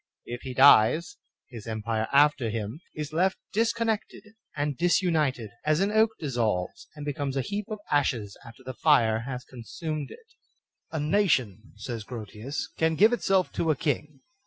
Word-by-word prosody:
If 120 0 -6
he 130 -1 -7
dies, 145 - +5 0.3
his 115 -2 -9
empire 110 0 -2
after 140 -4 +4
him 110 +6 -4
is 150 0 -5
left 185 +4 +2 0.2
disconnected 225 -1 -1 0.3
and 145 -1 -1
dis 175 +4 +2
united, 145 - 0
as 155 +1 +2
an 200 +2 +1
oak 220 +1 +4
dissolves 115 - -2
and 150 -1 -7
becomes 140 -1 -3
a - - +2
heap 205 +4 -4
of 215 - -4
ashes 120 -8 0
after 120 +3 -14
the 130 0 -6
fire 120 -6 +3
has 125 -2 -5
consumed 145 +5 -6
it. 475 - -13 0.6
A 160 - -3
nation, 145 - +1
says 110 +1 -6
Grotius, 115 +3 -6
can 160 0 +2
give 215 +7 +5
itself 195 -6 +1
to 165 - -1
a 155 - +3
king. 145 0 -3
145 Hz, 160 wpm, -27 LUFS, 115-165 Hz, 0.6 s, dies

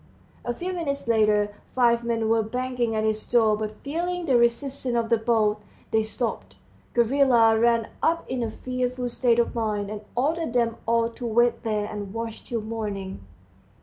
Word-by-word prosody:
A 240 - -2
few 365 +7 -4
minutes 285 -8 -3
later 210 -2 +3 0.2
five 235 -2 +3
men 230 -1 0
were 225 0 +3
banging 245 0 -2
at 215 - 0
his 215 0 0
door, 225 -3 +4
but 215 0 -5
feeling 345 +4 -2
the 270 -5 +2
resistance 240 +2 +1
of 230 -1 0
the 230 - +4
bolt, 220 -2 +1 0.3
they 220 - +3
stopped. 215 - -4 0.4
Gavrila 235 -2 +4
ran 230 -1 +3
up 335 +1 +1
in 255 -1 -2
a 230 - -1
fearful 250 +1 -3
state 240 -1 +2
of 235 - +1
mind, 210 -3 -2
and 210 -1 -5
ordered 310 +2 0
them 235 -2 +1
all 230 0 +3
to 240 +1 -6
wait 235 +1 +2
there 215 -2 -1
and 205 -1 -6
watch 225 -1 -5
till 235 -2 -3
morning. 205 - -5
230 Hz, 175 wpm, -25 LUFS, 220-250 Hz, 0.4 s, door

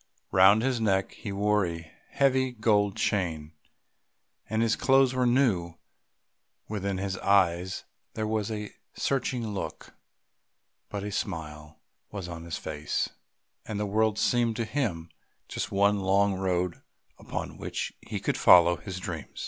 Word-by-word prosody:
Round 95 +4 +6
his 130 -3 0
neck 95 -3 +1
he 105 - -7
wore 105 +1 +2
a 85 -2 -5 0.2
heavy 130 -2 +2
golden 105 -3 +2
chain, 80 -6 -1 1.0
and 110 +1 +1
his 115 -1 +2
clothes 135 -1 +4
were 125 -1 +2
new; 110 -10 +2 0.9
within 100 -2 -2
his 95 0 -3
eyes 95 -2 +2 0.3
there 110 - -1
was 110 -1 -1
a 105 -2 -5 0.2
searching 125 -4 -1
look, 100 -2 -6 1.0
but 100 -1 -4
a 105 - -4
smile 75 -6 -5 0.3
was 100 -4 -6
on 85 -1 -7
his 85 - -4
face, 75 -1 -2 0.6
and 105 -2 -3
the 105 - 0
world 110 +1 +1
seemed 120 -1 +2
to 115 - -1
him 105 - -2 0.4
just - - -4
one 100 +1 +3
long 100 +1 +3
road 90 -2 -1 0.4
upon - - -6
which - - -4
he - - -5
could - - -1
follow 85 -1 +7
his 95 -3 -7
dream. - - -5
100 Hz, 140 wpm, -28 LUFS, 90-110 Hz, 1.0 s, follow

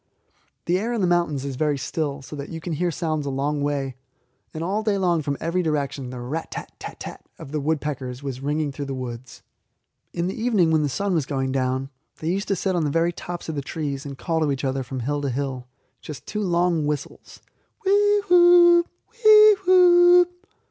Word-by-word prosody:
The 180 +2 +1
air 230 +4 -2
in 230 - -1
the - - +3
mountains 170 -6 0
is 135 -2 -5
very 150 -1 +1
still, 140 0 -3
so 150 - -9
that 140 -1 -7
you 165 - -6
can 165 +1 -5
hear 175 +3 0
sounds 155 -2 -2
a - - -1
long 145 +2 -1
way, 140 -3 -2 0.5
and 160 - -5
all 200 +5 -1
day 215 -2 0
long 175 -4 +1
from 140 -1 -3
every 170 +3 -1
direction 140 -5 -2
the 125 0 -7
'rat 140 +7 -5
tat - - -7
tat - - -9
tat!' - - -8
of 135 - -10
the 155 - -1
woodpeckers 140 -4 -3
was 135 -2 -5
ringing 150 +1 -1
through 140 +1 -6
the 135 -1 -4
woods. 120 -2 -8 0.7
In 170 0 -2
the 185 - -2
evening 215 -8 +1
when 160 -1 +3
the 145 - 0
sun 200 +8 -1
was 155 -6 0
going 135 -2 -2
down, 130 +1 -1 0.3
they 160 - -4
used 195 +2 -2
to 195 - +1
sit 190 +1 -1
on 170 - +1
the 150 - 0
very 165 +3 +1
tops 175 +1 -7
of 160 - -3
the 145 - -3
trees, 140 -1 -4
and 140 -2 -8
call 165 +2 -1
to 155 -2 +1
each 135 0 -3
other 135 0 -1
from 130 0 -5
hill 145 +4 -2
to 140 - -1
hill 130 -1 -4 0.3
just 150 -3 -9
two 210 - -4
long 175 -4 +1
whistles, 150 -2 -5 0.5
'whee 410 +1 +3
whoo, 350 -1 +7 0.4
whee 430 -1 +8
whoo.' 355 -1 +7
155 Hz, 215 wpm, -23 LUFS, 140-180 Hz, 0.7 s, whee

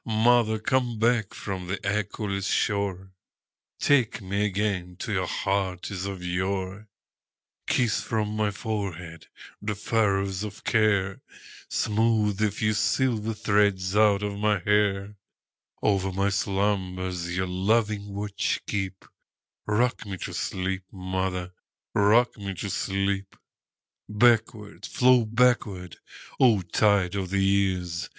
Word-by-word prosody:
Mother, 110 0 +3
come 125 0 0
back 115 -2 +2
from 95 -3 -5
the 100 +2 -2
echoless 100 -1 -2
shore, 95 -2 -1 0.7
Take 130 -6 +2
me 100 +1 -1
again 95 -3 -2
to 105 - -4
your 95 -2 0
heart 95 -1 -2
as 95 0 -4
of 95 -2 -6
yore; 95 +3 -2 0.8
Kiss 120 -3 +1
from 105 -1 -2
my 105 -1 +1
forehead 95 -6 -5 0.3
the 105 0 -2
furrows 100 -2 0
of 105 -1 -7
care, 100 -3 +1 0.5
Smooth 110 -2 +1
the 110 0 +3
few 110 +1 0
silver 115 0 0
threads 100 -2 +1
out 105 -1 +4
of 100 0 -3
my 105 0 +2
hair; 100 +1 +1 0.7
Over 95 -2 +1
my 100 +2 +1
slumbers 95 -3 -1
your 95 - +1
loving 100 +2 0
watch 100 0 -1
keep;—Rock 105 +4 -4
me 95 -1 -5
to - - -6
sleep, 95 0 -2
mother,—rock 95 +4 0
me 100 -1 -5
to 100 +3 -4
sleep! 100 0 -1 0.7
Backward, 105 -3 +2
flow 125 -2 +4
backward, 110 -6 +1 0.4
O 115 -7 +5
tide 100 +1 +2
of 95 -2 -3
the 100 0 +1
years! 95 -4 0
100 Hz, 115 wpm, -26 LUFS, 95-110 Hz, 0.8 s, O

